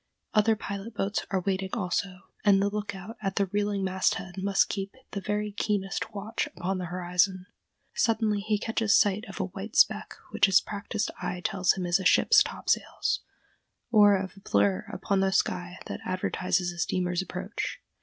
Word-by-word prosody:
Other 220 Hz, +1 st, +4 dB
pilot 205 Hz, +2 st, -6 dB
boats 200 Hz, +1 st, -1 dB
are 190 Hz, -1 st, 0 dB
waiting 190 Hz, 0 st, -1 dB
also, 190 Hz, -3 st, -2 dB, 0.2 s
and 200 Hz, -2 st, +5 dB
the 200 Hz, +1 st, +1 dB
lookout 205 Hz, 0 st, -5 dB
at 195 Hz, 0 st, -2 dB
the 200 Hz, -, +2 dB
reeling 205 Hz, 0 st, -1 dB
mast 190 Hz, 0 st, +1 dB
head 190 Hz, -1 st, -7 dB
must 195 Hz, 0 st, +2 dB
keep 195 Hz, +1 st, -4 dB, 0.2 s
the 200 Hz, -, -4 dB
very 210 Hz, +2 st, -2 dB
keenest 205 Hz, +1 st, -2 dB
watch 205 Hz, +3 st, -2 dB
upon 185 Hz, +2 st, -3 dB
the 180 Hz, -, -3 dB
horizon. 180 Hz, +1 st, 0 dB, 0.5 s
Suddenly 220 Hz, -2 st, +1 dB
he 210 Hz, +1 st, 0 dB
catches 220 Hz, 0 st, +2 dB
sight 205 Hz, +2 st, +2 dB
of 195 Hz, -, -8 dB
a -, -, +1 dB
white 195 Hz, +3 st, -8 dB
speck -, -, +3 dB, 0.2 s
which 205 Hz, -, +4 dB
his 195 Hz, 0 st, +6 dB
practised 210 Hz, +1 st, -3 dB
eye 180 Hz, -, -3 dB
tells 195 Hz, -4 st, +2 dB
him 185 Hz, -2 st, -4 dB
is 175 Hz, +2 st, +2 dB
a -, -, -4 dB
ship's 425 Hz, -, +6 dB
top -, -, -3 dB
sails, -, -, +1 dB, 0.7 s
or 205 Hz, -3 st, +7 dB
of 190 Hz, 0 st, -5 dB
a -, -, -14 dB
blur 100 Hz, -, +1 dB
upon 200 Hz, -1 st, 0 dB
the 190 Hz, 0 st, +2 dB
sky 180 Hz, -2 st, 0 dB
that -, -, -5 dB
advertises 185 Hz, -1 st, -1 dB
a 175 Hz, -, -10 dB
steamer's 180 Hz, +1 st, 0 dB
approach. 170 Hz, -, -4 dB
195 Hz, 180 wpm, -28 LUFS, 185-205 Hz, 0.7 s, or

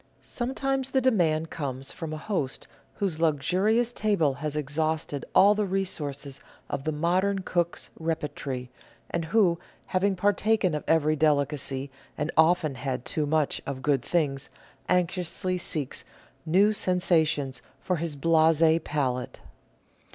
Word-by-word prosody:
Sometimes 265 Hz, +2 st, -1 dB
the 265 Hz, -, +2 dB
demand 170 Hz, -11 st, +2 dB
comes 135 Hz, -3 st, -4 dB
from 165 Hz, -2 st, -6 dB
a 155 Hz, -, -4 dB
host 155 Hz, -6 st, -3 dB, 0.3 s
whose 185 Hz, -6 st, -2 dB
luxu 160 Hz, +2 st, +1 dB
rious 230 Hz, +3 st, +2 dB
table 200 Hz, -, +1 dB
has 150 Hz, +2 st, -4 dB
exhausted 150 Hz, 0 st, -2 dB
all 200 Hz, +2 st, +7 dB
the 210 Hz, -1 st, -1 dB
resources 145 Hz, -8 st, -3 dB, 0.3 s
of 135 Hz, -, -3 dB
the 155 Hz, -, +1 dB
modern 185 Hz, +5 st, +1 dB
cook's 175 Hz, -1 st, -1 dB
repertory, 145 Hz, -6 st, -3 dB, 0.4 s
and 170 Hz, -1 st, -1 dB
who, 175 Hz, -2 st, +3 dB, 0.3 s
having 190 Hz, +1 st, +1 dB
partaken 205 Hz, 0 st, +2 dB
of 150 Hz, -, -2 dB
every 155 Hz, -1 st, +3 dB
delicacy, 140 Hz, -2 st, 0 dB, 0.3 s
and 150 Hz, +2 st, -1 dB
often 160 Hz, -2 st, +4 dB
had 130 Hz, -1 st, -4 dB
too 150 Hz, -2 st, -1 dB
much 155 Hz, -1 st, +1 dB
of 130 Hz, -1 st, -5 dB
good 140 Hz, -3 st, +2 dB
things, 140 Hz, -2 st, -1 dB, 0.4 s
anxiously 180 Hz, 0 st, 0 dB
seeks 155 Hz, -6 st, 0 dB, 0.4 s
new 195 Hz, +6 st, +5 dB
sensa 180 Hz, -4 st, +2 dB
tions 135 Hz, -4 st, -3 dB, 0.2 s
for 180 Hz, -2 st, -1 dB
his 160 Hz, -2 st, -3 dB
blase 160 Hz, +1 st, +4 dB
palate. 130 Hz, -4 st, -2 dB
160 Hz, 135 wpm, -27 LUFS, 145-185 Hz, 0.4 s, all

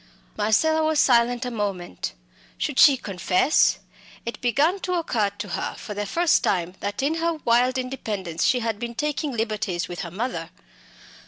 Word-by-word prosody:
Marcella 315 Hz, +10 st, +2 dB
was 310 Hz, -1 st, +2 dB
silent 240 Hz, 0 st, +3 dB
a 250 Hz, -, -3 dB
moment. 195 Hz, -, -4 dB, 0.4 s
Should -, -, -1 dB
she 275 Hz, -2 st, +8 dB
confess? 190 Hz, -, +2 dB, 0.5 s
It 235 Hz, -, -5 dB
began 290 Hz, -, +2 dB
to 365 Hz, -1 st, -2 dB
occur 235 Hz, -, 0 dB
to 205 Hz, -, -5 dB
her -, -, -3 dB
for 210 Hz, -, -7 dB
the 205 Hz, 0 st, -3 dB
first 340 Hz, -, +2 dB
time 180 Hz, -2 st, 0 dB
that 205 Hz, +5 st, -3 dB
in 310 Hz, +4 st, +1 dB
her 335 Hz, 0 st, +1 dB
wild 245 Hz, +2 st, +3 dB
independence 210 Hz, -10 st, -3 dB
she 250 Hz, -2 st, +3 dB
had 225 Hz, -2 st, -2 dB
been 235 Hz, 0 st, -5 dB
taking 295 Hz, +2 st, -1 dB
liberties 215 Hz, -6 st, -2 dB
with 175 Hz, -, -7 dB
her 175 Hz, -, -4 dB
mother. 185 Hz, -3 st, -4 dB
235 Hz, 165 wpm, -24 LUFS, 200-270 Hz, 0.5 s, she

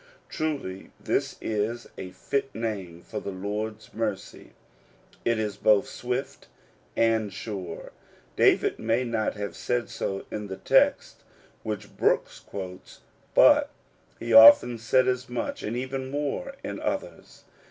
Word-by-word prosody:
Truly 140 Hz, -12 st, -4 dB
this -, -, -1 dB
is 110 Hz, +2 st, -2 dB
a 95 Hz, -, -7 dB
fit 135 Hz, +8 st, -3 dB
name 95 Hz, -7 st, -4 dB
for -, -, -5 dB
the -, -, -6 dB
Lord*s 105 Hz, +3 st, -5 dB
mercy: 110 Hz, -3 st, -4 dB, 0.7 s
it 115 Hz, -1 st, +1 dB
is 105 Hz, -2 st, -2 dB
both 105 Hz, -1 st, +4 dB
swift 125 Hz, +2 st, -4 dB, 0.5 s
and 110 Hz, -2 st, +2 dB
sure. 100 Hz, -4 st, -6 dB, 0.4 s
David -, -, +3 dB
may 115 Hz, +3 st, +1 dB
not 115 Hz, -3 st, -1 dB
have 100 Hz, -1 st, -5 dB
said 120 Hz, -1 st, -2 dB
so 95 Hz, 0 st, -4 dB
in 105 Hz, -1 st, -4 dB
the 95 Hz, -1 st, -6 dB
text -, -, +2 dB, 0.4 s
which 105 Hz, -3 st, -6 dB
Brooks -, -, +1 dB
quotes, 90 Hz, -2 st, -9 dB, 0.3 s
but -, -, +6 dB, 0.5 s
he 115 Hz, 0 st, -3 dB
often 115 Hz, +1 st, +9 dB
said 130 Hz, +3 st, +3 dB
as 125 Hz, 0 st, -1 dB
much 120 Hz, -1 st, -3 dB
and 115 Hz, +3 st, -3 dB
even 130 Hz, +1 st, -4 dB
more 150 Hz, -, -3 dB
in -, -, -5 dB
others. -, -, -5 dB
110 Hz, 130 wpm, -26 LUFS, 100-125 Hz, 0.7 s, often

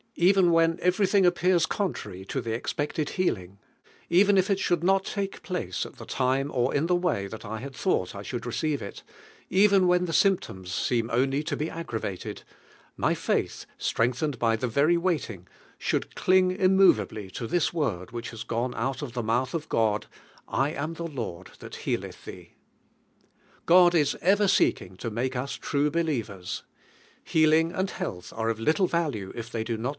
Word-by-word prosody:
Even 180 Hz, 0 st, +4 dB
when 165 Hz, 0 st, +3 dB
everything 190 Hz, +1 st, +3 dB
appears 175 Hz, -1 st, +3 dB
contrary 105 Hz, -, -4 dB
to 135 Hz, -, -3 dB
the 115 Hz, -1 st, -3 dB
ex 115 Hz, -, -3 dB
|'n 145 Hz, -, +2 dB
i. -, -, -11 dB
il -, -, 0 dB
healing, 100 Hz, -, -2 dB, 0.5 s
even 195 Hz, +3 st, +5 dB
if 190 Hz, +1 st, +3 dB
ii 200 Hz, -, +4 dB
should 175 Hz, -3 st, 0 dB
not 195 Hz, +1 st, +1 dB
lake 200 Hz, -1 st, -3 dB
place 175 Hz, -, -3 dB
lit -, -, -12 dB
the -, -, -9 dB
time 135 Hz, +2 st, 0 dB
or 125 Hz, 0 st, +1 dB
in 150 Hz, +4 st, +1 dB
(he 180 Hz, -, +2 dB
way 170 Hz, -, 0 dB
Ihal 110 Hz, +3 st, -9 dB
I 110 Hz, 0 st, -4 dB
bad 135 Hz, 0 st, -8 dB
thought 95 Hz, -, 0 dB
I 100 Hz, -, -6 dB
should 120 Hz, +2 st, -5 dB
receive 145 Hz, +4 st, -1 dB
il, 100 Hz, -, -6 dB, 0.6 s
even 195 Hz, -1 st, +5 dB
when 180 Hz, 0 st, +3 dB
the 165 Hz, -, -4 dB
symptoms 95 Hz, -, +1 dB
seem 115 Hz, +3 st, 0 dB
only 135 Hz, +5 st, +1 dB
to -, -, -2 dB
be 155 Hz, -, -2 dB
aggra 120 Hz, -9 st, -5 dB
vated, 95 Hz, -2 st, -5 dB, 0.5 s
my -, -, +2 dB
faith, -, -, -1 dB
strengthened 125 Hz, +5 st, 0 dB
by 115 Hz, -1 st, +2 dB
the 125 Hz, +3 st, -2 dB
very 145 Hz, +8 st, +3 dB
waiting, 150 Hz, -, -2 dB, 0.3 s
should -, -, -2 dB
cling 185 Hz, 0 st, +3 dB
immovably 185 Hz, -, +3 dB
to 115 Hz, +5 st, -5 dB
Ihis 175 Hz, +5 st, +1 dB
word 115 Hz, -, -2 dB
which 120 Hz, 0 st, -6 dB
has 115 Hz, -2 st, -7 dB
gone 120 Hz, +2 st, -2 dB
out 135 Hz, +2 st, -2 dB
of 135 Hz, -5 st, -6 dB
the 120 Hz, -1 st, -2 dB
mouth 120 Hz, +4 st, 0 dB
of 160 Hz, -2 st, -4 dB
God, 110 Hz, -2 st, +1 dB, 0.4 s
"1 135 Hz, +3 st, 0 dB
am 155 Hz, +3 st, -4 dB
the 170 Hz, 0 st, -4 dB
Lord 115 Hz, -, -6 dB
that -, -, -9 dB
healeth -, -, -3 dB
thee." -, -, -10 dB, 1.1 s
God 175 Hz, 0 st, +6 dB
is 150 Hz, -4 st, +2 dB
ever 200 Hz, +3 st, +4 dB
seeking 95 Hz, -, +2 dB
(o 115 Hz, -, -1 dB
mnke 125 Hz, +4 st, -2 dB
us 130 Hz, +3 st, -3 dB
true 145 Hz, +1 st, 0 dB
believers. 120 Hz, -, -2 dB, 0.6 s
Healing 160 Hz, +1 st, +3 dB
anil 190 Hz, +1 st, -2 dB
health 90 Hz, -1 st, -6 dB
are 115 Hz, 0 st, -1 dB
of 115 Hz, -1 st, -2 dB
little 160 Hz, -, +2 dB
value 145 Hz, -, -2 dB
if 115 Hz, -1 st, -6 dB
they 115 Hz, -1 st, -2 dB
do 115 Hz, 0 st, -3 dB
not. 120 Hz, +4 st, -2 dB
140 Hz, 185 wpm, -27 LUFS, 115-175 Hz, 1.1 s, God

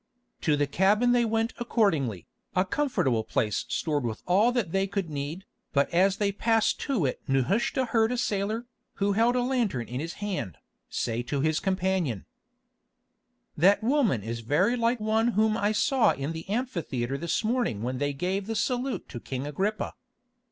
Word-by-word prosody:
To 150 Hz, -2 st, +2 dB
the 145 Hz, -, +2 dB
cabin 205 Hz, +11 st, +3 dB
they 240 Hz, -1 st, +3 dB
went 225 Hz, +1 st, 0 dB
accordingly, 160 Hz, -, +1 dB, 0.3 s
a 185 Hz, +1 st, +3 dB
comfortable 185 Hz, -, 0 dB
place 105 Hz, -1 st, -1 dB
stored 150 Hz, -4 st, -1 dB
with 115 Hz, -2 st, -4 dB
all 205 Hz, +7 st, +4 dB
that 235 Hz, -9 st, -1 dB
they 195 Hz, +1 st, +1 dB
could 195 Hz, -4 st, -3 dB
need; 150 Hz, +6 st, -4 dB, 0.3 s
but 140 Hz, +3 st, +2 dB
as 190 Hz, +3 st, +3 dB
they 205 Hz, -1 st, +1 dB
passed 225 Hz, +2 st, +1 dB
to 250 Hz, -, 0 dB
it 130 Hz, -, -2 dB
Nehushta 180 Hz, -, +1 dB
heard 225 Hz, -1 st, +2 dB
a 250 Hz, -, -1 dB
sailor, 220 Hz, 0 st, -1 dB, 0.3 s
who 200 Hz, 0 st, +1 dB
held 230 Hz, +4 st, +3 dB
a 250 Hz, -, +2 dB
lantern 230 Hz, -, 0 dB
in 125 Hz, +1 st, -4 dB
his 165 Hz, +3 st, -4 dB
hand, 185 Hz, -, -4 dB, 0.3 s
say 115 Hz, 0 st, -2 dB
to 135 Hz, +3 st, -2 dB
his 155 Hz, +2 st, +1 dB
companion: 185 Hz, -, -1 dB, 1.3 s
"That 195 Hz, +7 st, +4 dB
woman 230 Hz, -, +2 dB
is 115 Hz, +2 st, -4 dB
very 150 Hz, -, +2 dB
like 235 Hz, 0 st, +1 dB
one 220 Hz, +2 st, +1 dB
whom 215 Hz, 0 st, +3 dB
I 205 Hz, -1 st, +1 dB
saw 250 Hz, +3 st, +3 dB
in 140 Hz, +3 st, -4 dB
the 165 Hz, +2 st, -7 dB
amphitheatre 165 Hz, -, -2 dB
this 170 Hz, +5 st, -1 dB
morning 220 Hz, -, 0 dB
when 125 Hz, +1 st, -2 dB
they 145 Hz, 0 st, 0 dB
gave 185 Hz, +7 st, -2 dB
the 225 Hz, -, -2 dB
salute 250 Hz, +4 st, -1 dB
to 120 Hz, -, -6 dB
King 130 Hz, +3 st, -5 dB
Agrippa." 195 Hz, +9 st, -2 dB
195 Hz, 175 wpm, -27 LUFS, 140-225 Hz, 1.3 s, all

